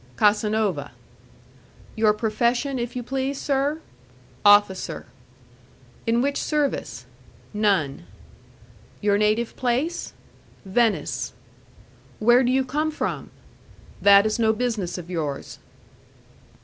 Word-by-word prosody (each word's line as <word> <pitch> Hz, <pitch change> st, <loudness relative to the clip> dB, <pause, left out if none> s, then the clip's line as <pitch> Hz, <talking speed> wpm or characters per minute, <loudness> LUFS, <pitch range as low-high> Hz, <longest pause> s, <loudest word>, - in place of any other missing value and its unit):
"Casanova." 210 Hz, -, +1 dB, 1.0 s
"Your 220 Hz, -1 st, +4 dB
profession, 235 Hz, +5 st, 0 dB
if 235 Hz, +1 st, -4 dB
you 250 Hz, -, -3 dB
please, 270 Hz, +2 st, -2 dB
sir?" 285 Hz, +2 st, 0 dB, 0.6 s
"Officer." 205 Hz, -5 st, +3 dB, 1.0 s
"In 235 Hz, +2 st, +2 dB
which 280 Hz, +1 st, -1 dB
service?" 300 Hz, -2 st, -2 dB, 0.5 s
"None." 190 Hz, -, 0 dB, 0.9 s
"Your 205 Hz, 0 st, +2 dB
native 215 Hz, +2 st, +1 dB
place?" 260 Hz, +8 st, -1 dB, 0.5 s
"Venice." 220 Hz, +3 st, 0 dB, 0.8 s
"Where 240 Hz, +3 st, +5 dB
do 245 Hz, -, +1 dB
you 265 Hz, 0 st, +2 dB
come 300 Hz, +4 st, -1 dB
from?" 310 Hz, -, -4 dB, 0.7 s
"That 200 Hz, 0 st, +7 dB
is 215 Hz, +2 st, 0 dB
no 220 Hz, -1 st, +3 dB
business 220 Hz, -7 st, -2 dB
of 175 Hz, 0 st, -8 dB
yours." 150 Hz, -5 st, -4 dB
220 Hz, 95 wpm, -24 LUFS, 205-255 Hz, 1.0 s, That